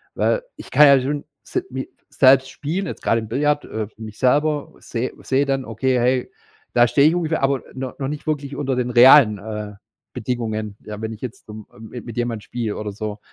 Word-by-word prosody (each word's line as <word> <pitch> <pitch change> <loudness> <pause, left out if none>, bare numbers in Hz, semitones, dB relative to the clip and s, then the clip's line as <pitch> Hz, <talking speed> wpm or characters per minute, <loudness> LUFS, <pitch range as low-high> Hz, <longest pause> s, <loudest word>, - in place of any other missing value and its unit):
Weil - - +1
ich - - -12
kann 150 -1 +7
ja 140 -1 +6
schon 145 +2 -3 0.2
sel - - -3
mi 130 +1 -5 0.2
selbst 135 0 +5
spielen, 170 +8 -3
jetzt - - -7
gerade 115 - +2
im 110 - -7
Billard, 145 +5 0
äh 110 -2 -4
mich 110 -1 -9
selber 145 +3 +1
sehe 120 +2 -4
sehe 135 +2 +1
dann: 135 -1 -1
„Okay, 125 +3 0
hey, 125 +1 +1 0.4
da 120 0 +5
stehe 140 +4 +4
ich 170 - 0
ungefähr.“ 160 -4 -1
aber 135 -1 +1
n 130 - -7 0.2
noch 135 - -3
nicht 150 +1 -6
wirklich 145 -2 -2
unter 135 -2 -1
den 125 -1 0
realen, 120 -3 +7
äh, 105 0 -6 0.4
Bedingungen, 110 -3 -3
ja, 105 -1 -7
wenn 110 0 -4
ich 110 - -12
jetzt, 130 -2 -8
ähm, 105 -1 -9
ähm, 110 -1 -12 0.2
mit 120 -1 -8
jemandem 120 -3 -2
spiele 115 -3 -4
oder 105 -1 -4
so. 105 0 -5
125 Hz, 205 wpm, -21 LUFS, 110-140 Hz, 0.4 s, kann